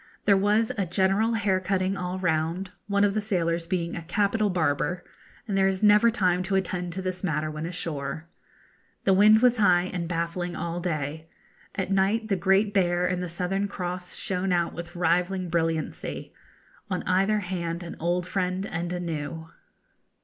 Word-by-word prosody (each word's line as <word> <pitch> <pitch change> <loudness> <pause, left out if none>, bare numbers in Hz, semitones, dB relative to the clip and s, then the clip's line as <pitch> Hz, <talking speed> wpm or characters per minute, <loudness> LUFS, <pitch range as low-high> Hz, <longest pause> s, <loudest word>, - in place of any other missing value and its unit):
There 200 - +6
was 210 +3 +2
a 190 - 0
general 195 +6 +2
hair 200 -3 +1
cutting 190 0 0
all 180 0 -3
round, 170 +1 -1 0.2
one 200 0 +2
of 205 -1 +3
the 215 - 0
sailors 170 -5 -1
being 170 -2 -2
a - - -4
capital 205 +5 +1
barber, 175 +1 0 0.4
and 200 - -1
there 195 0 +4
is 190 +1 -1
never 210 +2 +6
time 185 -5 +1
to 190 +2 -1
attend 180 -2 -1
to 190 +1 -4
this 185 0 -4
matter 155 -3 -1
when 155 +1 -4
ashore. 155 -3 -4 0.8
The 195 - +4
wind 215 +4 +6
was 250 -1 +5
high 185 -3 +3
and 175 -2 -2
baffling 170 +1 -2
all 170 +1 -3
day. 155 -2 -3 0.5
At 190 -1 -2
night 200 +3 +1
the 195 - +3
Great 195 +3 +2
Bear 175 -2 +2
and 180 0 0
the 180 - -3
Southern 185 +3 -1
Cross 180 -2 -5
shone 185 0 -1
out 175 -1 +1
with 170 +1 -8
rivalling 180 +2 +1
brilliancy: 165 -2 -2 0.6
'On 185 -2 -2
either 195 +3 +2
hand 175 -2 -3
an 170 - -7
old 175 +2 0
friend 185 0 -1
and 175 -2 -3
a 180 - -2
new.' 160 -1 -5
180 Hz, 175 wpm, -26 LUFS, 170-195 Hz, 0.8 s, There